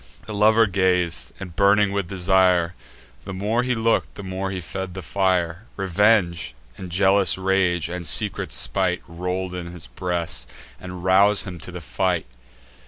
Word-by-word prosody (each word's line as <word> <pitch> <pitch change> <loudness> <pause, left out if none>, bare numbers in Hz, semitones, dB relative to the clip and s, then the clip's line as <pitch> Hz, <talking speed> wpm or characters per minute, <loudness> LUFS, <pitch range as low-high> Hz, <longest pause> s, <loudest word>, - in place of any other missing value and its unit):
The 110 - -7
lover 110 +2 +5
gaz'd, 90 - 0
and, 90 -3 -8
burning 100 0 +4
with 100 -3 -2
desire, 90 -2 +2 0.5
The 100 -1 -7
more 105 +5 0
he 125 0 0
look'd, 115 0 0
the 100 - -8
more 95 0 -4
he 95 -1 -4
fed 95 +2 -6
the 95 - -6
fire: 95 -1 0
Revenge, 95 - +1 0.2
and 95 - -8
jealous 95 +2 +3
rage, 95 -3 +1
and 85 -1 -4
secret - - +1
spite, - - 0
Roll 90 +2 -4
in 90 -1 -5
his 85 -2 -8
breast, 85 0 -4 0.3
and 90 -1 -8
rouse 100 +2 +4
him 90 -3 -7
to 85 +3 -8
the 90 -1 -7
fight. 90 +2 -1
95 Hz, 160 wpm, -23 LUFS, 85-100 Hz, 0.5 s, lover